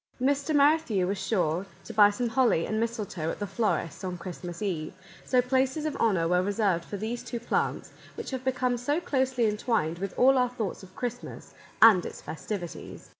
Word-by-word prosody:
Mr. 280 +4 +1
Merrithew 285 - +3
was 195 +2 -2
sure 190 -3 0 0.2
to 230 - -8
buy 205 -1 +7
some 235 +4 -2
holly 230 -8 +2
and 215 - -1
mistletoe 210 -8 -2
at - - -4
the 205 - -3
florist's 195 -6 -1
on 180 -1 -3
Christmas 175 0 -7
Eve, 165 -6 -3 0.3
so 250 -1 +2
places 265 +4 0
of 305 - -2
honour 185 -7 +2
were 180 +1 +3
reserved 195 -3 +1
for 205 - -6
these 225 +4 -4
two 240 - -5
plants, 235 - -1 0.2
which - - -6
have 260 -1 -4
become 255 -1 0
so 285 +7 0
closely 260 -6 0
entwined 210 -6 0
with 195 0 -5
all 265 +1 +5
our 250 -1 +2
thoughts 225 -6 -4
of 190 -1 -15
Christmas 245 -2 -6 0.3
and 210 -6 +8
its - - -7
festivities. 175 +1 -7
220 Hz, 185 wpm, -28 LUFS, 185-255 Hz, 0.3 s, and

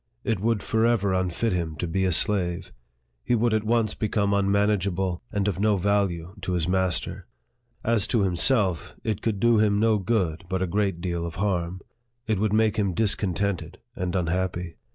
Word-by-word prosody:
It 115 -6 0
would 110 0 0
forever 110 -3 +2
unfit 95 +4 0
him 85 -3 -2
to 85 - -3
be 95 +3 0
a 90 - +2
slave. 90 -1 +1 0.5
He 120 - +1
would 115 0 +1
at 110 -1 +1
once 110 -1 +1
become 100 -2 0
unmanageable, 100 -2 +1
and 100 -1 0
of 95 -2 -1
no 105 0 +3
value 95 -3 0
to 95 0 -2
his 85 -2 0
master. 95 -1 -1 0.6
As 115 -3 +1
to 115 - +1
himself, 95 - +1
it 110 -2 -2
could 110 -4 -1
do 120 0 +4
him 105 -1 +3
no 110 -1 +3
good, 90 -6 -1
but 95 0 0
a - - +1
great 95 -1 -1
deal 85 -2 -2
of 85 -1 -5
harm. 90 -2 -1 0.4
It 110 -4 0
would 105 0 +1
make 110 0 +2
him 100 -4 0
discontented 95 -4 -1 0.2
and 90 -5 -3
unhappy." 90 -1 -2
100 Hz, 175 wpm, -25 LUFS, 90-105 Hz, 0.6 s, do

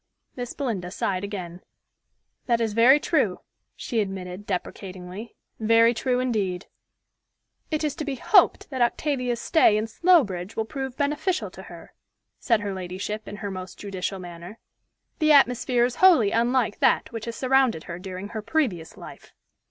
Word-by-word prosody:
Miss 245 -1 -5
Belinda 220 -11 -3
sighed 185 +1 -2
again. 185 -3 -6 0.9
"That 235 -2 +2
is 225 -2 -1
very 245 +6 +6
true," - - 0 0.3
she 235 - -3
admitted 190 -1 -4
deprecatingly; 185 +2 -6 0.2
"very 230 +1 +4
true 250 +2 0
indeed." 200 -8 -1 1.0
"It 310 -1 -1
is 300 -2 0
to - - -3
be 285 -2 -3
hoped 260 - +3
that 260 -2 -3
Octavia's 250 -1 0
stay 235 -7 +4
in 215 - -1
Slowbridge 225 - +2
will 220 - -1
prove 265 +2 -6
beneficial 300 +6 -1
to - - -11
her," - - -13 0.5
said 230 -4 +2
her 200 -1 -3
ladyship 190 +3 -5
in - - -7
her 205 -1 -5
most 185 -1 -8
judicial 195 -1 -4
manner. 175 +3 -10 0.6
"The 310 -2 +4
atmosphere 250 -3 +4
is 245 - -4
wholly 325 - +6
unlike 235 -1 +1
that - - +2
which 225 -2 -6
has 230 -1 -5
surrounded 260 -9 +2
her 170 0 -7
during 185 +1 -7
her 220 -1 -5
previous 210 - -2
life." - - -12
225 Hz, 155 wpm, -25 LUFS, 190-255 Hz, 1.0 s, very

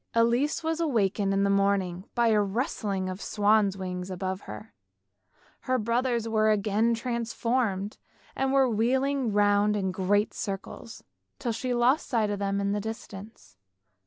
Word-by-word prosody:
Elise 240 +7 +2
was 325 0 -1
awakened 210 - +1
in 195 0 +2
the 200 - +2
morning 195 -2 +1
by 235 -1 +3
the 210 -1 +4
rustling 200 -2 -2
of 185 0 -5
the - - -7
swans' 205 -2 +2
wings 180 -1 -5
above 190 +1 -4
her; 105 0 -9 1.0
her 255 - +3
brothers 235 0 0
were 215 -1 +2
again 215 +2 +2
transformed 230 -3 -2 0.4
and 265 0 0
were 270 -1 +4
wheeling 255 +3 +1
round 205 0 +3
in 190 -2 -1
great 200 +3 +1
circles, 200 +3 -6 0.3
till 240 - -2
she 250 +3 -3
lost 245 +4 +2
sight 220 -4 +1
of 205 - -3
them 200 0 -1
in 200 0 0
the 205 0 -1
distance. 210 - -9
210 Hz, 155 wpm, -27 LUFS, 195-235 Hz, 1.0 s, the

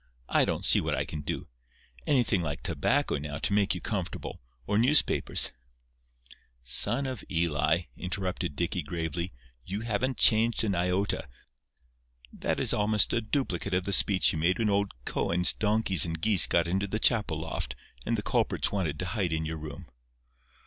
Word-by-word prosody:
I - - +3
don't - - -2
see - - +5
what - - -1
I - - -2
can 75 - -6
do. 70 - -5 0.6
Anything 120 -9 +2
like 75 -3 -4
tobacco, 75 - 0
now, 70 0 -6
to 100 - -1
make 100 -2 +2
you 90 - -6
comfortable—or 85 - -4
newspapers—" 135 +6 +3 1.1
"Son 120 - +2
of 130 -5 -5
Eli," 80 0 +1
interrupted 90 -4 -4
Dicky, 85 +2 -2
gravely, 85 +3 -4 0.3
"you 100 - -5
haven't 120 +3 -2
changed 115 0 +4
an 105 -3 0
iota. 90 -1 -1 1.0
That - - -2
is - - +3
almost 105 0 +2
a 115 - +1
duplicate 105 - -2
of 90 - 0
the 100 - 0
speech 95 0 +4
you 80 - -3
made 85 +4 +2
when 110 -3 0
old 100 -1 0
Koen's 90 +1 +3
donkeys 105 -3 +2
and 80 -1 0
geese 105 +1 +5
got 85 -1 +1
into 95 +3 -1
the 105 +2 -3
chapel 105 -11 +2
loft, 75 -5 -5 0.3
and - - -1
the - - -4
culprits - - 0
wanted 85 -7 -2
to 95 - -3
hide 90 -1 -2
in 80 0 -1
your 80 +1 -4
room." 75 -1 -9
90 Hz, 165 wpm, -28 LUFS, 80-105 Hz, 1.1 s, see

